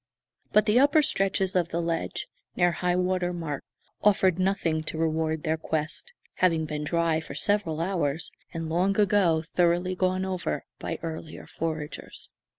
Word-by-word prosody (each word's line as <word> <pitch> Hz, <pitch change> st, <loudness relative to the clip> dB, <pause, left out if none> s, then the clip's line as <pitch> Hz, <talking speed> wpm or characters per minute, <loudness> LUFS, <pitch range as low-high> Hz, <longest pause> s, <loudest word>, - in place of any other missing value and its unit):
But 210 Hz, 0 st, +5 dB
the 215 Hz, +4 st, +4 dB
upper 290 Hz, +3 st, +5 dB
stretches 195 Hz, -8 st, +1 dB
of 175 Hz, -2 st, +2 dB
the 170 Hz, -, -1 dB
ledge, 165 Hz, -1 st, -2 dB, 0.3 s
near 175 Hz, -1 st, +4 dB
high 180 Hz, +1 st, 0 dB
water 180 Hz, 0 st, +1 dB
mark, 160 Hz, -5 st, -4 dB, 0.4 s
offered 190 Hz, -3 st, +4 dB
nothing 185 Hz, -4 st, +1 dB
to 160 Hz, -, -3 dB
reward 160 Hz, -1 st, 0 dB
their 160 Hz, -1 st, +1 dB
quest, 160 Hz, -, -3 dB, 0.3 s
having 165 Hz, -4 st, +3 dB
been 150 Hz, 0 st, -3 dB
dry 165 Hz, 0 st, +1 dB
for 160 Hz, -, -8 dB
several 205 Hz, -7 st, 0 dB
hours, 165 Hz, -4 st, -1 dB, 0.2 s
and 165 Hz, -1 st, -4 dB
long 185 Hz, +5 st, +1 dB
ago 185 Hz, -6 st, +3 dB
thoroughly 175 Hz, +2 st, +1 dB
gone 185 Hz, 0 st, 0 dB
over 185 Hz, -2 st, -2 dB
by 165 Hz, -, -3 dB
earlier 160 Hz, -1 st, -6 dB
foragers. 155 Hz, -2 st, -5 dB
170 Hz, 155 wpm, -27 LUFS, 160-185 Hz, 0.4 s, But